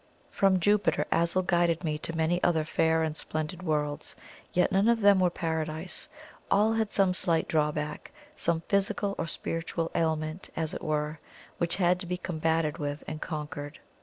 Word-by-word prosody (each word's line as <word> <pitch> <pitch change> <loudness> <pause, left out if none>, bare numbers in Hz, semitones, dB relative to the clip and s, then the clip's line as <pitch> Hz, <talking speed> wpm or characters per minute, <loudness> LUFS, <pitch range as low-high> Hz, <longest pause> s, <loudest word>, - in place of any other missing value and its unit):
From 195 -2 +3
Jupiter, 205 +3 +2
Azul 170 +3 +2
guided 175 -1 +2
me 155 -2 -1
to 165 +1 -4
many 165 +2 +1
other 160 -3 +3
fair 160 +1 +2
and 155 -1 -2
splendid 155 +3 -4
worlds 150 -4 -2 0.4
yet 180 - +2
none 195 +3 +3
of 235 -1 +3
them 200 -1 +6
were 180 -1 +4
Paradise; 160 0 -3 0.4
all 215 +2 +4
had 220 -2 0
some 190 -2 +3
slight 170 -3 +2
drawback 150 -1 -1 0.2
some 165 -1 0
physical 200 +2 0
or 165 - -1
spiritual 165 +1 -3
ailment, 160 +1 -1
as 160 -1 -1
it - - -5
were, 150 0 -2 0.4
which 170 0 0
had 180 -1 +2
to 180 - -7
be 180 +1 -2
combated 160 -2 -1
with 145 0 -3
and 155 0 -5
conquered. 150 -2 -5
165 Hz, 165 wpm, -29 LUFS, 155-180 Hz, 0.4 s, them